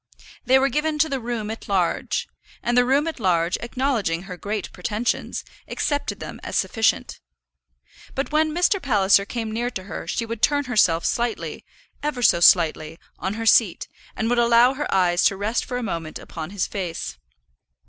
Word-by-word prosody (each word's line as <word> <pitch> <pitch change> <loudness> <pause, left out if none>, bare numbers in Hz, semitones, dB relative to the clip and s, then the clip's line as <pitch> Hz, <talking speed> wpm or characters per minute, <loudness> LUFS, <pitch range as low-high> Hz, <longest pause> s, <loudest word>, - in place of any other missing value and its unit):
They 260 +1 +5
were 270 +1 +2
given 300 +4 -1
to 315 +1 +2
the 270 -2 -2
room 230 -3 -4
at 225 - -8
large; 185 -4 0 0.4
and 240 - 0
the 245 0 +5
room 275 +4 +2
at 325 -4 -4
large, 175 -4 +1
acknowledging 235 -9 -1
her 190 -1 -7
great 205 +2 -4
pretensions, 210 +6 -2 0.2
accepted 290 -1 -2
them - - -8
as - - -6
sufficient. 225 -1 0 1.0
But 275 +2 -2
when 310 +1 +2
Mr. 360 +4 +2
Palliser 200 -6 +3
came 225 0 -4
near 235 +2 -1
to 190 -6 -6
her 195 - -7
she 230 - -2
would 230 -1 -6
turn 290 -1 +3
herself 210 -10 +2
slightly, 240 -1 -2 0.4
ever 290 -4 -2
so 170 - +5
slightly, 165 -2 +4 0.2
on 190 +2 -3
her 225 0 -4
seat, 220 -5 +4 0.3
and 220 - -1
would 240 +1 +2
allow 235 +2 +5
her 295 +2 -4
eyes 180 -2 +3
to 195 - +3
rest 215 +4 -1
for 245 - -4
a 250 - -3
moment 165 -7 -4
upon 160 -2 -7
his 200 -1 -1
face. 165 - -5
225 Hz, 180 wpm, -23 LUFS, 190-255 Hz, 1.0 s, They